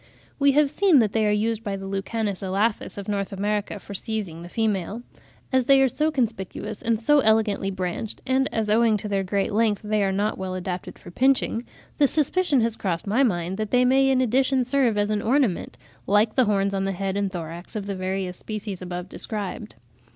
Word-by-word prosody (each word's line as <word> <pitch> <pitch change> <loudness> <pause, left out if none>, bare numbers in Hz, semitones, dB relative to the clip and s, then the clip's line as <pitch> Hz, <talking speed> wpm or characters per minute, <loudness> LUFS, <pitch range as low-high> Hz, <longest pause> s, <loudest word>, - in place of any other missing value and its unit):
We 280 -1 +4
have 290 -1 +3
seen 370 -1 +4
that 220 -5 +3
they 220 0 +1
are - - +3
used 220 +1 0
by 200 -3 -2
the 195 0 -7
Lucanus 195 +1 -3
elaphus 200 +4 -1
of 200 - -6
N. 200 -1 0
America 210 +1 -1
for 200 - -10
seizing 195 -5 -4
the 175 - -9
female. 215 +1 -1 0.5
As 260 -1 +3
they 275 +1 +6
are 270 - +5
so 305 +5 0
conspicuous 215 - -3
and 230 -1 0
so 295 +6 +4
elegantly 220 -4 +2
branched, 190 +3 -4
and 265 +1 +1
as 220 -1 -1
owing 220 0 +3
to 210 - -5
their 200 -1 0
great 195 +2 -1
length 215 -1 +1
they 210 -1 +1
are 195 - +1
not 205 +2 -1
well 185 -1 -3
adapted 180 0 -5
for 175 - -12
pinching, 255 +1 +1 0.3
the 285 - +6
suspicion 305 -1 +1
has 225 -1 +1
crossed 170 -6 -2
my 215 +6 +2
mind 185 -6 0
that 215 -1 -3
they 250 +2 +3
may 270 +1 +4
in 260 -1 +3
addition 260 +1 +2
serve 250 -4 +2
as 205 0 +1
an 210 -1 0
ornament, 240 -5 0 0.3
like 210 +2 +3
the 255 - +4
horns 200 -1 +1
on 195 0 -1
the 195 - -1
head 195 +1 -3
and 200 -1 -1
thorax 170 +1 -7
of 210 -2 -3
the 200 - -3
various 185 -1 -3
species 210 -3 -6
above 180 0 -5
described. 210 +1 -5
210 Hz, 210 wpm, -24 LUFS, 195-235 Hz, 0.5 s, they